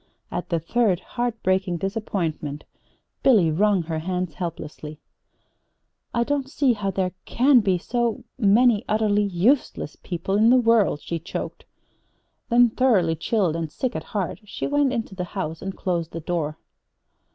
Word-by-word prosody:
At 175 Hz, -, -4 dB
the 170 Hz, -2 st, +1 dB
third 190 Hz, +2 st, +1 dB
heart 240 Hz, +1 st, -4 dB
breaking 185 Hz, -1 st, +1 dB
disappointment, 170 Hz, -7 st, -3 dB, 0.6 s
Billy 205 Hz, -12 st, +5 dB
wrung 195 Hz, +2 st, +2 dB
her 160 Hz, -1 st, -3 dB
hands 180 Hz, 0 st, -3 dB
helplessly. 155 Hz, -3 st, -6 dB, 1.1 s
"I 235 Hz, -, +1 dB
don't 275 Hz, +1 st, -1 dB
see 275 Hz, -3 st, +2 dB
how 205 Hz, -3 st, -2 dB
there 185 Hz, -1 st, -1 dB
can 260 Hz, +1 st, +4 dB
be 195 Hz, -4 st, +2 dB
so 240 Hz, +5 st, -1 dB
many 225 Hz, 0 st, +4 dB
utterly 210 Hz, -1 st, +2 dB
useless 200 Hz, -, +1 dB
people 185 Hz, +3 st, -2 dB
in 220 Hz, +2 st, +5 dB
the 255 Hz, -, +6 dB
world!" 230 Hz, -10 st, +3 dB
she 170 Hz, -, -4 dB
choked. 165 Hz, -, -6 dB, 0.8 s
Then, 240 Hz, 0 st, +5 dB
thoroughly 205 Hz, -11 st, +3 dB
chilled 175 Hz, 0 st, 0 dB
and 165 Hz, -2 st, -3 dB
sick 255 Hz, +7 st, -3 dB
at -, -, -4 dB
heart, 200 Hz, -5 st, -3 dB
she 210 Hz, -, -5 dB
went 285 Hz, -1 st, +2 dB
into 230 Hz, -5 st, -3 dB
the 185 Hz, -1 st, -4 dB
house 160 Hz, -4 st, -3 dB
and 195 Hz, 0 st, -5 dB
closed 170 Hz, -3 st, -2 dB
the 165 Hz, -, -4 dB
door. 155 Hz, -2 st, -2 dB
195 Hz, 150 wpm, -24 LUFS, 170-235 Hz, 1.1 s, the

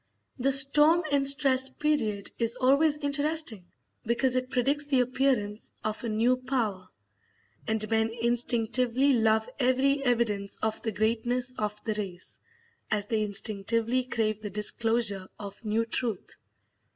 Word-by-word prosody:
The 270 Hz, +2 st, +1 dB
"storm 295 Hz, +5 st, +4 dB
and 280 Hz, -1 st, +2 dB
stress" 270 Hz, -2 st, +5 dB
period 260 Hz, -9 st, -1 dB
is 230 Hz, 0 st, +1 dB
always 280 Hz, +4 st, +3 dB
interesting 290 Hz, -, 0 dB, 0.4 s
because 245 Hz, +3 st, 0 dB
it 255 Hz, 0 st, -1 dB
predicts 280 Hz, +3 st, 0 dB
the 270 Hz, -3 st, +2 dB
appearance 250 Hz, -5 st, -1 dB
of 215 Hz, +1 st, -4 dB
a 235 Hz, -, -3 dB
new 230 Hz, +4 st, +2 dB
power; 235 Hz, -8 st, -3 dB, 0.8 s
and 220 Hz, -1 st, -1 dB
men 220 Hz, 0 st, +1 dB
instinctively 240 Hz, +3 st, +2 dB
love 220 Hz, -1 st, +2 dB
every 275 Hz, +2 st, +2 dB
evidence 230 Hz, -6 st, -1 dB
of 220 Hz, 0 st, -2 dB
the 225 Hz, -, -3 dB
greatness 235 Hz, +4 st, -1 dB
of 210 Hz, -2 st, -4 dB
the 220 Hz, -, -2 dB
race, 190 Hz, -4 st, -5 dB, 0.5 s
as 210 Hz, -2 st, 0 dB
they 220 Hz, 0 st, -1 dB
instinctively 220 Hz, +4 st, +1 dB
crave 215 Hz, -3 st, -2 dB
the 210 Hz, -, -5 dB
disclosure 210 Hz, -1 st, -1 dB
of 200 Hz, +1 st, -10 dB
new 220 Hz, +1 st, 0 dB
truth. 225 Hz, -3 st, -3 dB
235 Hz, 135 wpm, -27 LUFS, 215-265 Hz, 0.8 s, stress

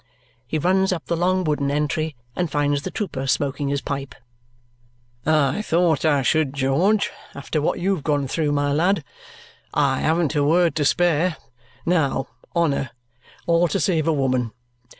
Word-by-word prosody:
He 155 Hz, -, -1 dB
runs 190 Hz, +4 st, +2 dB
up 170 Hz, -4 st, -3 dB
the 170 Hz, -, -1 dB
long 185 Hz, +2 st, +1 dB
wooden 150 Hz, -3 st, 0 dB
entry 150 Hz, +1 st, -1 dB, 0.2 s
and 175 Hz, -2 st, -1 dB
finds 145 Hz, 0 st, 0 dB
the 185 Hz, -, -4 dB
trooper 155 Hz, -8 st, -4 dB
smoking 140 Hz, +1 st, 0 dB
his 140 Hz, 0 st, -1 dB
pipe. 140 Hz, -3 st, -5 dB, 1.1 s
"I 155 Hz, +2 st, +2 dB
thought 165 Hz, -6 st, +1 dB
I 145 Hz, -3 st, +3 dB
should, 155 Hz, 0 st, +1 dB
George, 160 Hz, +11 st, +2 dB, 0.2 s
after 145 Hz, +2 st, -2 dB
what 150 Hz, -, 0 dB
you 195 Hz, +3 st, +1 dB
have 165 Hz, -7 st, -4 dB
gone 145 Hz, -3 st, 0 dB
through, 150 Hz, +2 st, 0 dB
my 145 Hz, 0 st, +1 dB
lad. 180 Hz, +7 st, +2 dB, 0.7 s
I -, -, +2 dB
haven't 160 Hz, -1 st, +1 dB
a 145 Hz, -, +2 dB
word 170 Hz, +3 st, +3 dB
to 150 Hz, -, +1 dB
spare. 175 Hz, +1 st, +2 dB, 0.5 s
Now, 155 Hz, -6 st, +1 dB, 0.3 s
honour! 145 Hz, -6 st, +1 dB, 0.6 s
All 170 Hz, 0 st, +3 dB
to 195 Hz, -, -1 dB
save 160 Hz, -1 st, +1 dB
a -, -, +4 dB
woman. 130 Hz, -5 st, 0 dB
155 Hz, 160 wpm, -22 LUFS, 140-175 Hz, 1.1 s, a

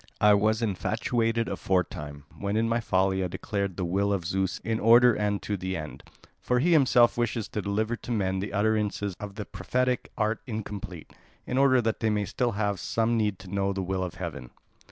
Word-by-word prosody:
I 105 Hz, 0 st, +6 dB
was 110 Hz, +3 st, +2 dB
infatuated 115 Hz, +3 st, 0 dB
aforetime, 75 Hz, -6 st, -2 dB
when 100 Hz, +1 st, -2 dB
in 115 Hz, +1 st, +2 dB
my 115 Hz, +1 st, +1 dB
folly 95 Hz, -3 st, +1 dB
I -, -, 0 dB
declared 100 Hz, +1 st, -3 dB
the 90 Hz, -, -1 dB
will 100 Hz, +4 st, +1 dB
of 95 Hz, -4 st, -1 dB
Zeus 95 Hz, +1 st, -1 dB
in 110 Hz, 0 st, -1 dB
order 120 Hz, +2 st, +6 dB
and 105 Hz, -1 st, 0 dB
to 105 Hz, -, -2 dB
the 95 Hz, -1 st, -3 dB
end. 75 Hz, -2 st, -7 dB, 0.4 s
For 125 Hz, -, +1 dB
he 160 Hz, +8 st, +2 dB
himself 125 Hz, -6 st, +5 dB
wishes 115 Hz, -2 st, -1 dB
to 105 Hz, -, -3 dB
deliver 110 Hz, +3 st, -1 dB
to 120 Hz, -, -8 dB
men 95 Hz, -4 st, 0 dB
the 100 Hz, -, -4 dB
utterances 105 Hz, -1 st, 0 dB
of 100 Hz, -1 st, -7 dB
the 105 Hz, -1 st, -5 dB
prophetic 125 Hz, 0 st, -1 dB
art 110 Hz, 0 st, 0 dB
incomplete, 105 Hz, -7 st, -6 dB, 0.3 s
in 125 Hz, -, -1 dB
order 130 Hz, -3 st, +4 dB
that 110 Hz, -1 st, -1 dB
they 110 Hz, -, +1 dB
may 105 Hz, -1 st, 0 dB
still 120 Hz, +3 st, -1 dB
have 100 Hz, -2 st, -1 dB
some 115 Hz, +5 st, 0 dB
need 105 Hz, -3 st, 0 dB
to 95 Hz, 0 st, -10 dB
know 100 Hz, 0 st, 0 dB
the 95 Hz, -1 st, -3 dB
will 95 Hz, 0 st, -2 dB
of 90 Hz, 0 st, -5 dB
heaven." 80 Hz, -8 st, -6 dB
105 Hz, 200 wpm, -27 LUFS, 95-115 Hz, 0.4 s, I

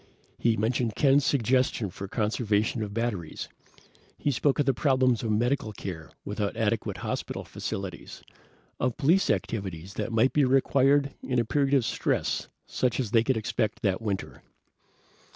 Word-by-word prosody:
He 115 Hz, -1 st, +2 dB
mentioned 115 Hz, +1 st, 0 dB
Ken's 140 Hz, 0 st, +4 dB
suggestion 125 Hz, -5 st, +1 dB
for 95 Hz, +1 st, -7 dB
conservation 110 Hz, +1 st, 0 dB
of 105 Hz, -2 st, -3 dB
batteries. 105 Hz, -7 st, -3 dB, 0.7 s
He 145 Hz, -, 0 dB
spoke 135 Hz, +2 st, +1 dB
of 145 Hz, -, +2 dB
the 135 Hz, -, +3 dB
problems 130 Hz, -3 st, +2 dB
of 115 Hz, -, -2 dB
medical 120 Hz, +1 st, +1 dB
care 85 Hz, -5 st, -7 dB, 0.2 s
without -, -, -2 dB
adequate -, -, 0 dB
hospital -, -, -3 dB
facilities, 95 Hz, -3 st, -6 dB, 0.6 s
of 125 Hz, 0 st, 0 dB
police 160 Hz, +6 st, +3 dB
activities 95 Hz, -3 st, -2 dB
that 115 Hz, -, -3 dB
might 115 Hz, +4 st, +3 dB
be 150 Hz, -, +4 dB
required 135 Hz, +1 st, +3 dB
in 125 Hz, -, -2 dB
a 120 Hz, -, +2 dB
period 140 Hz, +3 st, +2 dB
of 130 Hz, -4 st, +3 dB
stress -, -, -1 dB, 0.2 s
such 125 Hz, -1 st, -1 dB
as 120 Hz, -6 st, -2 dB
they 115 Hz, -1 st, +4 dB
could 130 Hz, -1 st, +1 dB
expect 110 Hz, +1 st, -2 dB
that 100 Hz, 0 st, +1 dB
winter. 100 Hz, -4 st, -4 dB
115 Hz, 150 wpm, -27 LUFS, 105-135 Hz, 0.7 s, Ken's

